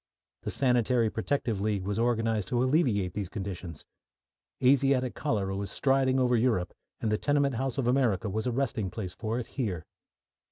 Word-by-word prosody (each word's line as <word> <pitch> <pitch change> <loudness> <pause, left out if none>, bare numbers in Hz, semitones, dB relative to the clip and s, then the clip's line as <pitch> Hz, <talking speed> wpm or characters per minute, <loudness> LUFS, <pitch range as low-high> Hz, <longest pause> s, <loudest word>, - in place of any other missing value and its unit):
The - - -4
Sanitary 125 -3 +2
Protective 115 -3 -1
League 105 -2 0
was 100 +3 -2
organised 115 -4 +1
to 120 0 +1
alleviate 125 - +2
these 100 -4 -3
conditions. 95 -5 -6 0.8
Asiatic 130 -1 +3
cholera 100 -9 -1
was 100 -1 -3
striding 135 +2 +2
over 125 -1 +3
Europe, 110 -7 +1 0.3
and 110 - 0
the 105 - +1
tenement 145 -2 +2
house 130 +3 -2
of 130 -3 0
America 120 -6 +2
was 110 +4 -2
a - - +1
resting 115 -6 -1
place 95 -2 -5
for 110 +1 -3
it 125 - -3
here. 95 - -3
115 Hz, 165 wpm, -29 LUFS, 100-130 Hz, 0.8 s, Asiatic